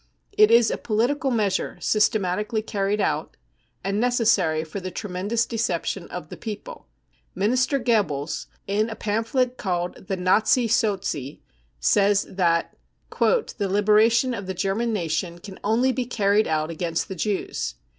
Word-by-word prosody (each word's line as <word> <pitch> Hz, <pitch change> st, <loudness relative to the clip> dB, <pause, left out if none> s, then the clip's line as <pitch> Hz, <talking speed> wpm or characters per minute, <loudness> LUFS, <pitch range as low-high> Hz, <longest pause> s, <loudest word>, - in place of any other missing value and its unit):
It 425 Hz, +1 st, +6 dB
is 235 Hz, -1 st, +5 dB
a -, -, -3 dB
political 255 Hz, +6 st, 0 dB
measure 210 Hz, -6 st, 0 dB
systematically 210 Hz, 0 st, +1 dB
carried 205 Hz, -1 st, -1 dB
out, -, -, -1 dB, 0.5 s
and 195 Hz, +2 st, -1 dB
necessary 220 Hz, -10 st, +2 dB
for 160 Hz, +5 st, -6 dB
the 185 Hz, 0 st, -5 dB
tremendous 205 Hz, +5 st, -2 dB
deception 230 Hz, +1 st, -2 dB
of -, -, -7 dB
the -, -, -8 dB
people. 225 Hz, -, -8 dB, 0.5 s
Minister 255 Hz, +7 st, +1 dB
Goebbels, 185 Hz, -, 0 dB, 0.2 s
in 210 Hz, +3 st, 0 dB
a 220 Hz, -, -5 dB
pamphlet 230 Hz, +5 st, -1 dB
called 180 Hz, -2 st, -3 dB
The 190 Hz, -, -2 dB
JSfazi 215 Hz, +6 st, +3 dB
Sozi, 195 Hz, -, -1 dB, 0.4 s
says 200 Hz, -, +3 dB
that 170 Hz, -3 st, +1 dB, 0.2 s
" -, -, -19 dB
The 430 Hz, -, +1 dB
liberation 215 Hz, +5 st, +3 dB
of 200 Hz, -4 st, -5 dB
the 190 Hz, -, -3 dB
German 205 Hz, +6 st, 0 dB
nation 170 Hz, -3 st, -2 dB
can 190 Hz, +2 st, -11 dB
only 235 Hz, +5 st, +2 dB
be 255 Hz, -1 st, -2 dB
carried 210 Hz, -3 st, +2 dB
out 155 Hz, 0 st, -1 dB
against 165 Hz, 0 st, -2 dB
the -, -, -5 dB
Jews. 190 Hz, -, -2 dB
210 Hz, 145 wpm, -24 LUFS, 185-230 Hz, 0.5 s, It